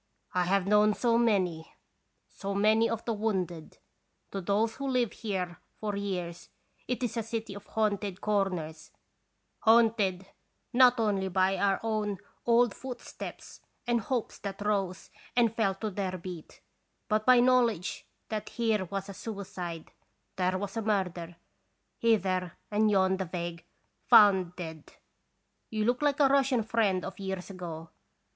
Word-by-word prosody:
I 180 -1 +2
have 195 +1 +2
known 210 +1 +4
so 235 -2 +2
many, 185 -8 0 0.5
so 195 0 -5
many 215 +3 +4
of 230 -1 -3
the 230 - 0
wounded. 185 -7 -2 0.5
To 195 - -3
those 210 +4 0
who 275 0 -3
live 250 -4 +1
here 185 -5 -4 0.2
for 210 -1 -2
years 180 -4 -4 0.4
it 250 +1 -2
is 235 -1 -2
a - - +1
city 225 -1 -4
of 200 +1 -11
haunted 205 -3 -1
corners, 180 -7 -1 0.7
haunted 220 -5 +3 0.5
not 250 0 +6
only 200 -4 +1
by 190 +1 +2
our 195 -1 +1
own 215 -3 -1 0.3
old 235 -2 +4
footsteps 250 -1 -8 0.2
and 240 -1 +1
hopes 245 +1 -3
that 200 0 -6
rose 195 -4 -1 0.2
and 235 -3 +3
fell 200 -4 +1
to 215 +2 -4
their 185 -1 -3
beat, 175 -2 -9 0.5
but 215 0 +1
by 255 +1 +6
knowledge 240 -7 +2 0.2
that 215 -1 -3
here 220 -5 0
was 195 +2 -4
a 200 - -7
suicide, 185 -6 -6 0.4
there 185 0 +1
a 200 +3 -3
murder, 180 -5 -1 0.6
hither 185 -6 +1 0.2
and 215 +1 +3
yon 190 -2 +3
the 190 - -2
vague 170 -1 -5 0.2
" - - -46
found 190 -4 +6
dead." 160 -4 -8 0.8
You 215 -1 -1
look 245 +3 +1
like 290 -1 +2
a 285 - +6
Russian 270 -3 +3
friend 210 -5 +1
of - - -7
years 190 -1 -4
ago. 165 -3 -7
200 Hz, 145 wpm, -29 LUFS, 185-225 Hz, 0.8 s, not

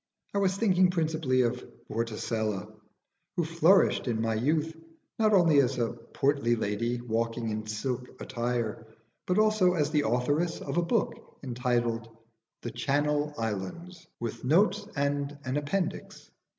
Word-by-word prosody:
I 200 - +1
was 190 -1 +1
thinking 185 -4 +4
principally 155 -7 +1
of 120 - -1 0.2
Vorticella, 110 -3 -2 0.6
who 175 - +2
flourished 165 0 +4
in 115 -2 0
my 115 0 0
youth 155 +8 0 0.4
not 215 -1 +4
only 170 -7 +5
as 130 0 0
a 120 -1 0
portly 120 +2 0
lady 115 +3 -1
walking 115 0 -2
in 110 0 -4
silk 125 +4 -4
attire, 120 -2 -3 0.4
but 180 - +1
also 215 -4 +4
as 150 -2 +1
the 150 -5 +2
authoress 145 +9 0
of - - -4
a - - +4
book 210 +6 -2
entitled 120 -2 -1 0.5
'The 120 - -4
Channel 145 +1 0
Islands, 115 - -5
with 115 0 -5
Notes 200 +8 +3
and 145 0 -1
an 130 +1 -2
Appendix.' 150 +5 -3
140 Hz, 135 wpm, -29 LUFS, 115-165 Hz, 0.6 s, only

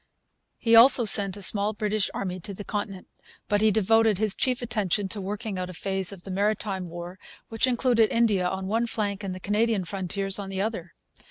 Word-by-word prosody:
He 230 -1 +3
also 240 +1 +7
sent 200 -2 +4
a 200 - -6
small 205 +2 +2
British 210 -1 -1
army 185 -1 -4
to 200 +2 -8
the 205 - -7
Continent. 205 -2 -5 0.4
But 205 0 +1
he 220 - +4
devoted 220 0 +3
his 215 -1 +2
chief 250 +2 -1
attention 210 -4 -1
to 205 +1 -3
working 205 0 -5
out 180 0 -4
a 185 - -9
phase 190 +1 -1
of 190 -3 -11
the 195 - -8
'Maritime 195 -2 -1
War' 175 +2 -8 0.3
which 225 +3 +1
included 240 -3 +2
India 210 -6 +1
on 190 0 -4
one 225 +4 0
flank 205 -3 -3
and 190 -2 -4
the - - -8
Canadian 210 0 0
frontiers 195 +2 -3
on 195 -1 -6
the 190 -1 -5
other. 195 -5 -4
205 Hz, 200 wpm, -25 LUFS, 190-220 Hz, 0.4 s, also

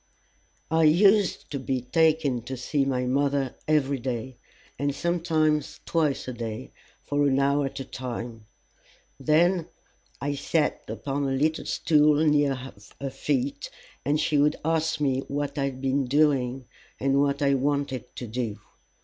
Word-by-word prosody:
I 160 0 +4
used 195 +5 +4
to 140 - -3
be 130 -1 -2
taken 150 -1 +2
to 130 +1 -5
see 135 +3 0
my 130 -2 0
mother 140 0 +1
every 140 -3 +2
day, 120 0 -4 0.4
and 140 0 0
sometimes 160 -3 0
twice 155 -6 0
a 130 - -3
day, 115 -2 -6 0.3
for 145 0 +1
an 135 -1 +2
hour 140 +1 +2
at 135 +1 -7
a - - -6
time. 120 -3 -6 0.7
Then 165 +5 +3 0.5
I 145 +1 -2
sat 150 +2 0
upon 140 0 -3
a 135 - 0
little 155 +4 0
stool 150 -2 +3
near 145 -2 +3
her 130 +1 -8
feet, 140 +1 -2 0.3
and 145 +3 +1
she 150 -1 +2
would 150 +1 +3
ask 160 0 +1
me 135 -3 +1
what 145 0 -3
I 140 - +1
had 130 -1 -4
been 135 0 +1
doing, 135 -2 +2 0.3
and 135 +1 +2
what 140 0 +1
I 140 0 +4
wanted 140 -1 -1
to 125 - -5
do. 115 -2 -3
140 Hz, 150 wpm, -26 LUFS, 130-150 Hz, 0.7 s, I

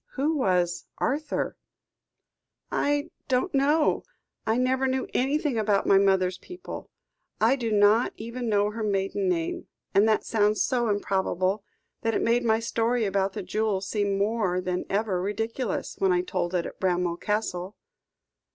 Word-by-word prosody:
"Who 295 +4 0
was 180 - +1
Arthur?" 295 +2 -1 1.1
"I 290 +2 0 0.2
don't 260 +8 0
know. 295 +3 +3 0.5
I 220 +1 +2
never 260 +1 +2
knew 260 0 0
anything 275 -1 +1
about 210 -2 +2
my 195 - +5
mother's 190 -2 +2
people. 360 0 -9 0.5
I 230 +5 +4
do 235 -4 -3
not 210 +3 +4
even 235 +2 -4
know 205 0 +2
her 225 +1 -6
maiden 195 -2 0
name. 165 -2 -2 0.3
And 205 +3 +5
that 215 - +2
sounds 210 -1 +2
so 240 -3 +1
improbable, 195 -1 0 0.4
that 225 -1 0
it - - +1
made 235 +1 +2
my 220 -1 +3
story 230 0 0
about 195 -1 0
the - - -5
jewel 210 +1 0
seem 200 0 -1
more 200 -3 +1
than 180 0 -2
ever 200 -3 0
ridiculous, 225 +3 -3
when 190 -1 +3
I 180 0 +3
told 180 -1 -2
it 175 - 0
at - - -8
Bramwell 180 -2 0
Castle." 205 -2 -2
210 Hz, 150 wpm, -26 LUFS, 190-240 Hz, 1.1 s, my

